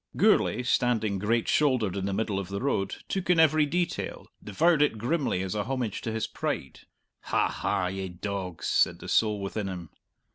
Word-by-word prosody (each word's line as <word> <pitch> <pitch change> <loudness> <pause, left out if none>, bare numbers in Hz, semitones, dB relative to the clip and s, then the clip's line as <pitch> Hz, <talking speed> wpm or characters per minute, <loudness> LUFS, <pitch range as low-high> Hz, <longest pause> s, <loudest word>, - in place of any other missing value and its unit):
Gourlay, 125 +4 +3
standing 110 -5 +1
great 115 +3 +1
shouldered 125 -10 +2
in 100 0 -2
the - - -1
middle 100 0 -1
of 95 - -5
the 100 +1 -4
road, 110 -8 -1
took 190 -2 -3
in 175 -2 +5
every 155 -1 +5
detail, 175 +3 -2 0.2
devoured 155 - +2
it 150 -6 +2
grimly 125 - 0
as 95 - -3
a 105 -1 -2
homage 125 -4 -2
to 115 - -3
his 110 0 -1
pride. 65 - -4 0.5
"Ha, - - +2
ha, 90 - -1
ye 95 +1 -3
dogs!" 90 -1 -5
said - - +2
the - - -10
soul 105 -2 +2
within 100 +1 -3
him. 90 -3 -6
105 Hz, 185 wpm, -28 LUFS, 95-135 Hz, 0.5 s, in